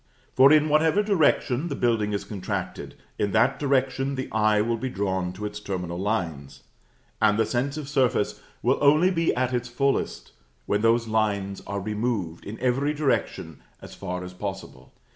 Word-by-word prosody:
For, 135 +2 +7
in 155 0 +5
whatever 160 +6 +3
direction 160 - +2
the 140 - -3
building 115 -5 +1
is 100 - -2
contracted, 100 -4 -5 0.2
in 100 -2 0
that 125 +5 +3
direction 135 -1 0
the 130 0 -5
eye 105 -1 +3
will 115 +2 0
be 130 - -3
drawn 95 -4 -2
to 105 +3 -6
its 105 0 -5
terminal 90 -4 -4
lines; 80 - -3 0.6
and 105 -1 +4
the 110 - +3
sense 130 +6 -2
of 150 -3 -5
surface 130 -7 0 0.2
will 125 +3 +2
only 155 +6 +5
be 165 -2 +1
at 130 0 0
its 125 0 -1
fullest 135 +3 -1 0.3
when 105 +7 0
those 115 +1 +3
lines 100 -3 -1
are 100 0 -3
removed, 105 -4 -3
in 105 +3 -7
every 135 +4 +1
direction, 135 - -1 0.2
as - - -11
far 90 0 -5
as 90 0 -8
possible. 95 +1 -7
115 Hz, 170 wpm, -25 LUFS, 100-135 Hz, 0.6 s, For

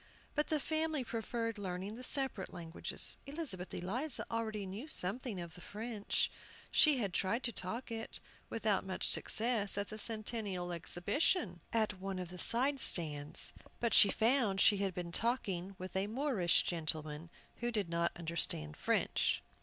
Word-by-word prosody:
But 300 0 0
the 310 - +1
family 315 -1 -1
preferred 230 -1 -3
learning 190 +1 -4
the 250 - -9
separate 265 -7 0
languages. 170 -2 -3
Elizabeth 275 - -4
Eliza 235 - -1
already 220 -3 -2
knew 200 +10 -7
something 220 - -1
of 170 -2 -7
the 175 - -12
French. 215 +1 -2 0.4
She 300 -3 +6
had 200 -6 -2
tried 215 +8 0
to 235 - -1
talk 225 +5 -4
it, 225 0 -5 0.3
without 215 -3 0
much 190 -1 -2
success, 220 -3 +2
at 200 0 -2
the 215 - -7
Centennial 215 -5 -2
Exhibition, 175 - +1
at 215 -4 0
one 195 0 -4
of 180 -2 -5
the 180 0 -9
side 265 +7 +7
stands. 150 - +3 0.3
But 235 -3 0
she 200 - +8
found 225 -4 +2
she 205 - +6
had 195 -2 -2
been 175 -1 -4
talking 195 -4 -1
with 185 0 -8
a 190 +1 0
Moorish 225 - +2
gentleman 155 -1 -2 0.3
who 240 - -2
did 210 -5 0
not 170 0 0
understand 165 - -2
French. - - +1
205 Hz, 155 wpm, -35 LUFS, 180-235 Hz, 0.4 s, she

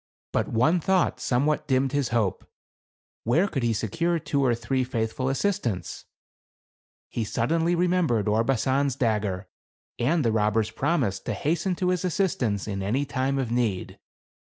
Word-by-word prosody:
But - - 0
one 150 +10 +2
thought 185 +2 +1
somewhat 140 +5 0
dimmed 130 -1 +2
his 145 -3 0
hope; 115 -5 -1 0.7
where 155 - +3
could 140 -8 -2
he 120 -1 +1
secure 165 +10 0
two 140 -3 -1
or 120 -3 +3
three 125 +3 -1
faithful 125 +1 -2
assistants? 135 - -2 1.0
He 115 - -3
suddenly 165 +11 +1
remembered 170 - +1
Orbasan's 130 +5 +1
dagger, 105 -6 -1 0.5
and 150 +4 +2
the 115 - +3
robber's 110 0 +1
promise 135 - 0
to - - -4
hasten 170 +4 0
to 180 +1 0
his 180 -1 0
assistance 155 - 0
in 100 -2 -3
any 120 +9 0
time 135 0 -1
of 130 -4 -2
need. 115 -6 -1
130 Hz, 145 wpm, -26 LUFS, 110-160 Hz, 1.0 s, where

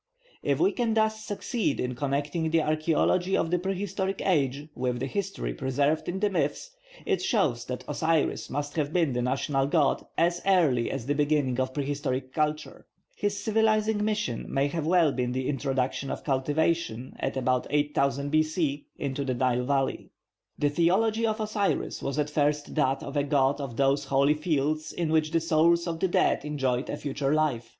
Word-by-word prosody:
If - - 0
we 375 - +4
can 235 -3 0
thus 220 0 +1
succeed 205 - -2
in 125 0 -1
connecting 145 +5 -1
the 160 0 +2
archaeology 160 +4 +1
of 165 - -1
the 180 - +2
prehistoric 195 +1 -2
age 145 -5 +1
with 125 -2 -2
the 130 - -2
history 180 - -3
preserved 140 - 0
in 185 +2 -3
the 205 0 +1
myths, - - -1 0.3
it 400 -3 0
shows 195 - +1
that 125 0 -5
Osiris 160 +1 0
must 145 +1 -3
have 150 -1 0
been 165 -7 +2
the 125 - 0
national 135 +2 0
god 145 -2 +2
as 170 +1 +2
early 160 -11 +3
as 135 -4 -4
the 145 - +1
beginning 145 -3 +1
of 130 0 -1
prehistoric 135 -2 -2
culture. 150 0 -2 0.3
His 205 0 -2
civilising 220 -1 +2
mission 210 - -2
may 140 +1 +1
well 170 +2 +3
have 145 - +1
been 125 -1 0
the 130 0 -2
introduction 135 -1 -1
of - - -4
cultivation, 145 -2 -1
at - - -2
about 130 -1 +1
8000 145 -1 0
B.C., 155 -2 0
into 140 0 -3
the 130 -2 -1
Nile 125 0 +1
valley. 135 0 -1 0.5
The 145 -1 +1
theology 215 +8 +2
of 220 +1 -1
Osiris 210 -2 -1
was 140 +1 -3
at 150 0 0
first 150 0 0
that 135 -3 +1
of 140 - -7
a 145 - +2
god 140 0 +2
of 125 -5 -6
those 140 +1 +2
holy 140 +2 +3
fields 155 0 -1
in 165 -3 -2
which 155 -1 +2
the 165 +1 +2
souls 165 +1 +3
of 165 -2 -3
the 190 - +2
dead 175 - +2
enjoyed 135 -4 -1
a 145 - -3
future 140 0 -1
life. 130 -7 0
150 Hz, 180 wpm, -27 LUFS, 135-175 Hz, 0.5 s, we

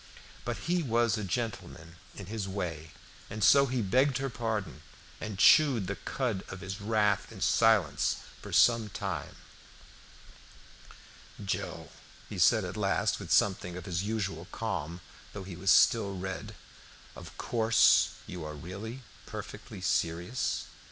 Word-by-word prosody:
But 120 -1 -2
he 175 +1 +1
was 120 -5 +2
a 110 - -3
gentleman 95 -6 -4 0.2
in 100 - -8
his 105 0 -4
way, 85 -5 -4 0.4
and 105 0 -4
so 140 -1 +6
he 125 -2 -1
begged 130 +6 +2
her 135 -1 -3
pardon, 110 -8 -3 0.4
and 105 -3 -5
chewed 130 -2 +6
the 100 +2 -3
cud 110 +2 -3
of 95 - -8
his 95 +2 -6
wrath 105 -1 +1
in - - -10
silence 100 -11 +3 0.2
for - - -9
some 115 -3 +4
time. 95 -7 -5 2.1
"Joe," - - -4 0.4
he - - -6
said - - +5
at - - -6
last, - - 0
with - - -7
something 90 -3 +2
of 90 - -8
his 85 -1 -2
usual 100 -5 -3
calm, 90 -6 -4 0.3
though 100 - -6
he 95 -2 -8
was 95 +3 -2
still 100 +1 +5
red, 95 +1 -5 0.6
"of - - -11
course 110 -1 +4
you 90 -2 -7
are 75 0 -6
really 100 - -7 0.2
perfectly 105 -1 -8
serious? 85 +6 -1
100 Hz, 140 wpm, -30 LUFS, 90-115 Hz, 2.1 s, so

